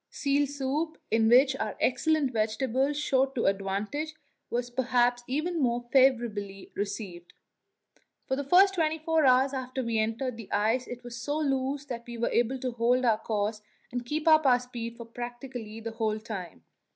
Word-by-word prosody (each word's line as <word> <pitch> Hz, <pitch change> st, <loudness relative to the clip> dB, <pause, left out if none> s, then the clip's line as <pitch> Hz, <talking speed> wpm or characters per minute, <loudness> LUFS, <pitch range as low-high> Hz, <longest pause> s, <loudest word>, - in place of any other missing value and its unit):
Seal 285 Hz, 0 st, +1 dB
soup, 285 Hz, +3 st, -2 dB
in 225 Hz, 0 st, +3 dB
which 265 Hz, +3 st, +6 dB
our -, -, -3 dB
excellent 280 Hz, +1 st, +1 dB
vegetables 255 Hz, +6 st, 0 dB
showed 270 Hz, -2 st, +1 dB
to 235 Hz, -, 0 dB
advantage, 200 Hz, +11 st, -1 dB, 0.3 s
was 245 Hz, 0 st, -2 dB
perhaps 245 Hz, -1 st, +2 dB
even 310 Hz, +5 st, -1 dB
more 240 Hz, -1 st, 0 dB
favourably 230 Hz, -7 st, +2 dB
received. 200 Hz, -4 st, -5 dB, 0.9 s
For 265 Hz, -, -1 dB
the 285 Hz, -, -3 dB
first 375 Hz, +7 st, +5 dB
twenty 320 Hz, -3 st, +1 dB
four 320 Hz, -2 st, +2 dB
hours 260 Hz, +2 st, +4 dB
after 260 Hz, 0 st, -3 dB
we 230 Hz, -2 st, 0 dB
entered 230 Hz, +3 st, -1 dB
the 225 Hz, -4 st, -10 dB
ice 225 Hz, +5 st, +1 dB
it 245 Hz, 0 st, -8 dB
was 235 Hz, -1 st, -7 dB
so 290 Hz, +4 st, -2 dB
loose 275 Hz, -1 st, -1 dB
that 240 Hz, -3 st, -7 dB
we 235 Hz, -1 st, -7 dB
were 230 Hz, -, 0 dB
able 240 Hz, +3 st, +1 dB
to 255 Hz, -, -2 dB
hold 245 Hz, +2 st, +2 dB
our 220 Hz, -2 st, +3 dB
course 210 Hz, -1 st, -2 dB, 0.3 s
and 245 Hz, 0 st, -3 dB
keep 300 Hz, +6 st, -3 dB
up 315 Hz, -1 st, +7 dB
our 250 Hz, -1 st, +5 dB
speed 235 Hz, -2 st, -7 dB
for 235 Hz, -, -8 dB
practically 240 Hz, -1 st, -7 dB
the 225 Hz, 0 st, -5 dB
whole 220 Hz, -1 st, -1 dB
time. 195 Hz, -, -7 dB
245 Hz, 175 wpm, -28 LUFS, 225-275 Hz, 0.9 s, up